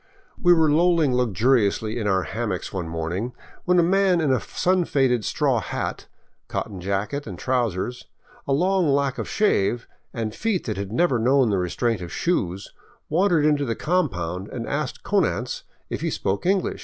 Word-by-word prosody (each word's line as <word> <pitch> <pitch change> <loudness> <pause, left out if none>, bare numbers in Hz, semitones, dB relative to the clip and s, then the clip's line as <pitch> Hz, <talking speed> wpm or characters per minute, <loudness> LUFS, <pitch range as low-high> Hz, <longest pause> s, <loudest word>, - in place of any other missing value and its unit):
We 175 - +5
were 160 -2 +5
lolling 165 -3 +3
luxuriously 115 -1 +1
in 105 - -2
our 95 -2 +2
hammocks 110 -5 -4
one 90 -4 -3
morning, 85 +9 -3 0.3
when 180 0 +3
a 175 - +5
man 190 0 +3
in 150 -5 +2
a 125 - +1
sun 185 0 +1
faded 130 -7 +1
straw - - +1
hat, - - -4 0.4
cotton 100 -4 -4
jacket 100 +9 -2
and 95 -4 -6
trousers, 120 -2 -2 0.4
a - - -1
long 180 +3 +2
lack 140 -1 +1
of - - -4
shave, 120 - +1 0.2
and 110 -2 -3
feet 210 - -1
that 110 - -2
had 100 0 -4
never 130 -1 +2
known 130 0 +3
the 100 - +1
restraint 100 +4 -1
of 85 - -7
shoes, 95 - -2 0.4
wan 185 +6 +3
dered 155 -4 +3
into 145 -1 +2
the 115 -4 -1
compound 90 - -1
and - - -5
asked - - -3
Konanz - - 0 0.3
if - - -3
he - - 0
spoke 100 - -2
English. 195 0 +1
125 Hz, 175 wpm, -24 LUFS, 100-165 Hz, 0.4 s, We